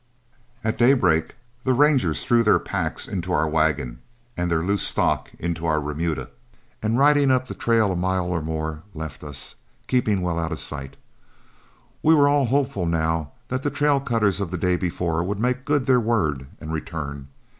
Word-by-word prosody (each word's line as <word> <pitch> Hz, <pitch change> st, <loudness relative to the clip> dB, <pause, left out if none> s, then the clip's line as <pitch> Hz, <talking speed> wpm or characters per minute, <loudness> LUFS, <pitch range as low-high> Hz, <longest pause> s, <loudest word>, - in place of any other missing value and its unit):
At 110 Hz, +1 st, -1 dB
daybreak 105 Hz, -, +3 dB, 0.3 s
the 130 Hz, -1 st, +2 dB
Rangers 135 Hz, -, +3 dB
threw 120 Hz, -1 st, +4 dB
their 105 Hz, -, +4 dB
packs -, -, -3 dB
into 90 Hz, -3 st, -4 dB
our 80 Hz, -2 st, +2 dB
wagon 75 Hz, -6 st, 0 dB, 0.4 s
and 90 Hz, 0 st, -1 dB
their 80 Hz, -1 st, +1 dB
loose 100 Hz, +2 st, +1 dB
stock -, -, +2 dB
into 85 Hz, -1 st, -3 dB
our 80 Hz, -1 st, +2 dB
remuda, 75 Hz, +2 st, -3 dB, 0.5 s
and 110 Hz, +2 st, 0 dB
riding 145 Hz, 0 st, +5 dB
up 130 Hz, 0 st, +2 dB
the -, -, -5 dB
trail 115 Hz, -4 st, +2 dB
a -, -, -1 dB
mile 95 Hz, 0 st, 0 dB
or 90 Hz, -2 st, -1 dB
more, 80 Hz, 0 st, -4 dB
left 75 Hz, -3 st, -7 dB
us, 75 Hz, -2 st, -6 dB, 0.3 s
keeping 110 Hz, -6 st, +1 dB
well 85 Hz, -1 st, -1 dB
out 80 Hz, 0 st, -2 dB
of 80 Hz, -, -3 dB
sight. 70 Hz, -2 st, -5 dB, 1.1 s
We 160 Hz, +1 st, +5 dB
were 145 Hz, -2 st, +5 dB
all 145 Hz, -2 st, +3 dB
hopeful 130 Hz, -8 st, 0 dB
now 80 Hz, -2 st, -1 dB, 0.2 s
that 130 Hz, +1 st, -2 dB
the 145 Hz, -, 0 dB
trail 145 Hz, 0 st, +2 dB
cutters 110 Hz, -7 st, 0 dB
of 95 Hz, -, -2 dB
the 90 Hz, -, -3 dB
day 90 Hz, +1 st, +1 dB
before 85 Hz, -2 st, -1 dB
would 100 Hz, +3 st, -2 dB
make 125 Hz, +3 st, -1 dB
good 145 Hz, -3 st, +1 dB
their 130 Hz, -2 st, +4 dB
word 80 Hz, -, 0 dB
and 80 Hz, +1 st, -6 dB
return. 75 Hz, -4 st, -5 dB
90 Hz, 180 wpm, -23 LUFS, 80-125 Hz, 1.1 s, riding